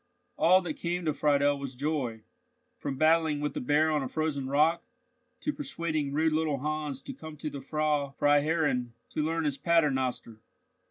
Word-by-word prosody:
All 185 +3 +5
that 170 -4 -5
came 175 0 -2
to 155 - +1
Friedel 145 -1 +2
was 135 -2 -6
joy, 130 -5 -2 0.5
from 140 -2 -5
battling 160 -1 +3
with 150 -1 -2
the - - -3
bear 150 +4 +3
on 150 -1 +1
a 135 - -2
frozen 150 -2 -2
rock, 155 +4 +3 0.6
to 300 - -1
persuading 155 - -2
rude 155 +2 +2
little 155 -2 +1
Hans 150 -1 -3
to 275 - -7
come 155 - -10
to 155 0 -5
the 140 - -6
Frau 150 0 0
Freiherrinn 145 -4 +2 0.2
to 155 - -1
learn 165 +1 0
his 145 -3 -1
Paternoster. 130 -9 +1
150 Hz, 170 wpm, -29 LUFS, 140-160 Hz, 0.6 s, All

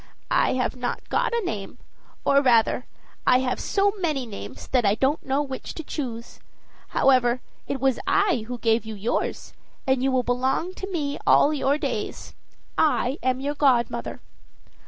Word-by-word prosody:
"I - - +3
have 255 0 -1
not 245 -1 -4
got - - +1
a 470 -3 -1
name 210 - -5 0.5
or, 280 0 +5
rather, 245 -1 +3 0.4
I 250 - +7
have 255 -1 -1
so 400 0 +1
many 305 -8 -1
names 210 -4 -8
that 255 -2 +2
I 200 0 +3
don't 270 +6 +1
know 270 +2 0
which 265 -2 -6
to 325 - -5
choose. 240 -7 -6 0.5
However, 255 -2 +3 0.3
it 275 - -2
was 265 -1 +1
I 375 - +2
who 245 0 -4
gave 230 0 +2
you 220 -1 -7
yours, 205 +4 -2 0.3
and 265 -2 +2
you 265 +1 +2
will 255 -1 +2
belong 260 +9 0
to 385 +1 -6
me 290 -5 -2
all 300 - +5
your 280 0 +1
days. - - -4 0.5
I 290 -2 +2
am 255 0 0
your 285 +1 -1
godmother." 245 -5 +1
260 Hz, 165 wpm, -25 LUFS, 245-290 Hz, 0.5 s, I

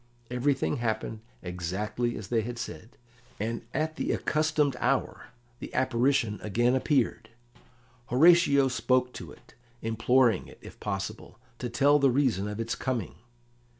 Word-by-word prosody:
Everything 135 +3 0
happened 110 -1 -2 0.2
exactly 95 +7 -3
as 100 -2 -8
they 115 -2 +2
had 120 +2 -5
said, 115 0 -8 0.4
and 115 +2 -2
at 155 +2 -2
the - - -1
accustomed 155 -3 +1
hour 135 +2 -1 0.3
the - - -7
apparition 130 -3 +1
again 120 +4 +1
appeared. 130 -4 +1 0.8
Horatio 145 0 +5
spoke 125 0 +1
to - - -8
it, - - -18 0.3
imploring 115 0 +2
it, - - -14
if - - -13
possible, 105 +1 -5 0.2
to 125 - -3
tell 140 +5 +4
the 140 -1 +4
reason 125 -7 +1
of 105 +1 -5
its 115 +1 -2
coming. 125 -4 -3
120 Hz, 135 wpm, -28 LUFS, 110-135 Hz, 0.8 s, Horatio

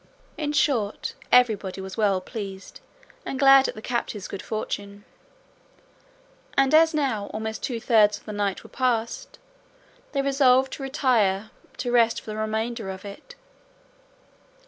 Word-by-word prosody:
In 295 -2 -2
short, 245 -9 0 0.2
everybody 215 -6 +3
was 190 0 -7
well 200 -4 +1
pleased 195 -1 -8 0.4
and 270 - -4
glad 270 0 +7
at - - -5
the 215 - -10
captive's 230 -5 -3
good 195 - -6
fortune; 205 -1 -5 1.5
and 275 +1 +3
as 320 0 +5
now 245 -9 -1
almost 220 0 -5
two 240 -3 -3
thirds 215 -3 +4
of - - -20
the 215 - -6
night 205 -2 -2
were - - -14
past, 255 - -2 0.8
they 275 -1 0
resolved 265 -1 +3
to - - -7
retire 230 -8 +1 0.3
to 245 - -3
rest 230 -1 +3
for 215 - -9
the 215 - -6
remainder 220 0 -2
of 190 +1 -7
it. 205 - -11
225 Hz, 145 wpm, -25 LUFS, 205-265 Hz, 1.5 s, glad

